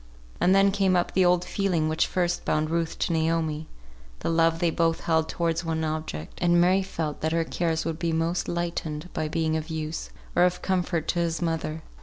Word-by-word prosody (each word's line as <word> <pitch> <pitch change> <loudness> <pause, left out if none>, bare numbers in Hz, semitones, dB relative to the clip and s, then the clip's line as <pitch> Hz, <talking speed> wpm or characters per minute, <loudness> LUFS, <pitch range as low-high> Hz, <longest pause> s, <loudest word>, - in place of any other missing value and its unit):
And 185 +2 +4
then 195 0 +5
came 195 -2 +2
up 175 - +1
the 190 - +4
old 180 0 +3
feeling 180 -6 0
which 155 0 +1
first 175 -1 0
bound 155 +1 0
Ruth 165 -1 -1
to 170 - 0
Naomi; 160 -1 0 0.5
the - - -1
love 165 0 +3
they 170 0 +1
both 165 0 +1
held 160 -1 +1
towards 170 0 -1
one 160 -1 -1
object; 155 - -4
and 175 0 +4
Mary 185 +3 +4
felt 160 -5 -4
that 160 +1 0
her 165 0 +2
cares 165 -1 -1
would 165 -1 -3
be 170 -1 0
most 165 +2 0
lightened 170 -2 -3
by 155 - -1
being 160 0 0
of 160 0 -3
use, 160 0 -4 0.3
or - - +4
of 180 0 +2
comfort 180 -4 0
to 175 - +1
his 165 -1 0
mother. 165 -2 -2
165 Hz, 205 wpm, -26 LUFS, 160-175 Hz, 0.5 s, then